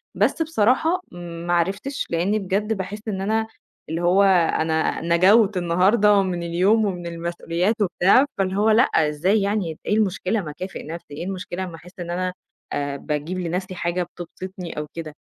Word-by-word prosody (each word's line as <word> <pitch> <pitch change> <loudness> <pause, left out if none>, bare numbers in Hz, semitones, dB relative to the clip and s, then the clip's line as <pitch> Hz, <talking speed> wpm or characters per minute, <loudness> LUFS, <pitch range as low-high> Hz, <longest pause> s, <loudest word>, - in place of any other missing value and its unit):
بس - - +1
بصراحة 320 - +2
ما 175 0 -5
عرفتش، 200 +11 -1
لإن 180 +6 +1
بجد 205 +3 -1
باحس 205 +2 -6
إن 195 -3 -2
أنا 220 +3 0 0.4
اللي 165 +2 -2
هو 180 +3 +4
أنا 165 -4 +2
نَجَوت 190 +5 +4
النهارده 195 +4 +4
من 180 -2 -2
اليوم، 190 +6 +3
ومن 180 -3 -3
المسؤوليات 170 +3 -1
وبتاع، 195 +7 +4
فاللي 190 -1 0
هو 210 +2 +3
لأ، 220 +3 +6 0.3
إزاي 185 +8 +1
يعني، 200 -5 -1
إيه 210 - +1
المشكلة؟ 205 0 0
ما 155 -5 -6
أكافئ 185 +6 -7
نفسي 165 -1 -8
إيه 150 - -5
المشكلة 185 -1 -4
أما 175 -3 -6
أحس 180 +3 -15
إن 175 -1 -5
أنا، 180 +1 -2 0.4
آآ، 145 -1 -2
باجيب 150 +6 -3
لنفسي 185 +2 -3
حاجة 175 +1 -1
بتبسطني 175 0 -8
أو 150 0 -3
كده 155 -3 -7
185 Hz, 165 wpm, -23 LUFS, 170-205 Hz, 0.4 s, لأ